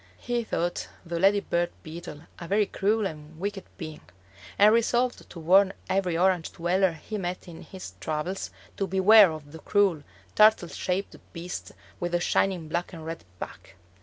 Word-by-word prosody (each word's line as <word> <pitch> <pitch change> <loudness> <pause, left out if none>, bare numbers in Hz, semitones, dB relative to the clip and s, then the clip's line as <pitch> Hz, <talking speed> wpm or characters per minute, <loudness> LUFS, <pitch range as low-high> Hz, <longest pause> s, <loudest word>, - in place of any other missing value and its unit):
He 240 -1 -2
thought 175 -5 -2 0.2
the 170 0 -3
lady 200 +2 +4
bird 175 -2 0
beetle 155 -2 -8 0.2
a 170 - -7
very 205 +3 +3
cruel 210 +2 0
and 155 -2 -7
wicked 200 +1 -4
being, 155 -4 -7 0.6
and 210 +2 +7
resolved 240 +2 +1
to 170 - -9
warn 190 +4 +5 0.2
every 185 -3 +1
Orange 180 -2 +2
dweller 180 +1 +1
he 210 +7 -6
met 180 -1 -4
in 165 -2 -10
his 185 - -9
travels 155 - -3 0.3
to 195 - -1
beware 190 +1 +7
of 150 -2 -9
the 160 - -10
cruel, 195 -6 +2 0.3
turtle 215 -5 +5
shaped 190 +2 -3 0.2
beast 175 +1 -6 0.3
with 175 0 -3
the 175 - +3
shining 175 -2 +1
black 175 +4 -3
and 160 -2 -8
red 165 +1 -6
back. - - -9
180 Hz, 165 wpm, -27 LUFS, 165-200 Hz, 0.6 s, and